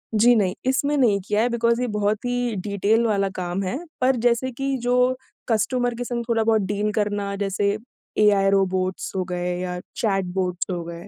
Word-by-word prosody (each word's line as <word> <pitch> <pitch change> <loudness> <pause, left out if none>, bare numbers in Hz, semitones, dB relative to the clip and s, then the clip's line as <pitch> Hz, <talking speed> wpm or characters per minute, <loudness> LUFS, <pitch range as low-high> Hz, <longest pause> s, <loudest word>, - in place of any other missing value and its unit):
जी 235 +3 +6
नहीं, 190 -4 +2
इसमें 280 +3 +1
नहीं 225 -7 +3
किया 210 +1 +2
है, 240 - +2
बिकॉज़ 235 0 +1
ये 250 - 0
बहुत 210 +2 0
ही 245 -2 -1
डीटेल 205 +3 +2
वाला 200 -3 +1
काम 180 +1 -2
है 190 +7 -2 0.2
पर 260 +1 +4
जैसे 245 +2 +2
कि 270 +2 -2
जो 250 +1 +2 0.3
कस्टमर 245 +2 +1
के 245 - -4
संग 240 -1 -3
थोड़ा-बहुत 225 -1 +3
डील 205 +2 -1
करना 205 -1 -1
जैसे 200 0 0 0.5
एआई 200 -2 +4
रोबोट्स 190 -1 0
हो 185 - 0
गए 180 0 -2
या 180 -1 -3 0.2
चैटबॉट्स 185 -4 -1
हो 175 -2 -3
गए, 170 0 -8
210 Hz, 180 wpm, -23 LUFS, 195-240 Hz, 0.5 s, जी